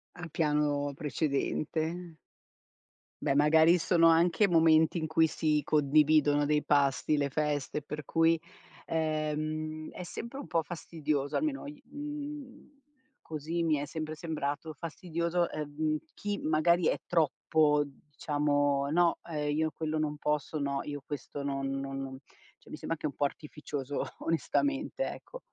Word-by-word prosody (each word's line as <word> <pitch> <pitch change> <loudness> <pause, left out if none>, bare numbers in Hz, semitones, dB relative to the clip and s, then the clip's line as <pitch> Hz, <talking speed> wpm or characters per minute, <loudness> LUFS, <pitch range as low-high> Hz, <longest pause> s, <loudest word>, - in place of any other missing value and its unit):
A 175 -1 -7
piano 150 -3 +1
precedente. 160 +3 -2 1.1
Beh, 135 - +2
magari 160 +4 +6
sono 165 -1 +4
anche 175 +5 +4
momenti 160 0 +5
in 160 - -1
cui 160 +1 +4
si 155 -1 +1
condividono 150 0 +4
dei 150 0 +2
pasti, 140 +1 +2
le 140 -1 +1
feste, 150 0 -1
per 150 +1 -6
cui, 165 +3 +3 0.5
ehm, 155 0 -2
è 180 - -7
sempre 235 +9 -7
un 280 - -7
po' 165 -1 +1
fastidioso, 155 -3 -2
almeno 290 -2 -1
i 290 0 -9
mhmm, 290 -1 -8 0.4
così 160 +2 -3
mi 160 -2 +2
è 145 - -2
sempre 155 0 -5
sembrato 155 -1 -3
fastidioso, 170 +2 -2
uhm, 155 +1 -1
chi 205 0 -3
magari 160 +2 +3
è - - 0
troppo 155 -2 +3 0.3
diciamo: 145 -1 +1
"no, 170 +1 +3
ehm, 150 -1 -1
io 155 0 +1
quello 155 -1 -2
non 150 -1 -1
posso, 150 +1 -1
no 140 -1 -1
io 145 -1 -5
questo 145 0 -6
non 135 -1 -2
non 135 0 -4
no" 135 -1 -6 0.5
cioè - - -17
mi - - -6
sembra - - -3
anche 165 - -5
un 140 - -6
po' - - -1
artificioso 145 -1 -3 0.2
onestamente, 285 - 0
ecco. - - -8
155 Hz, 140 wpm, -30 LUFS, 145-165 Hz, 1.1 s, magari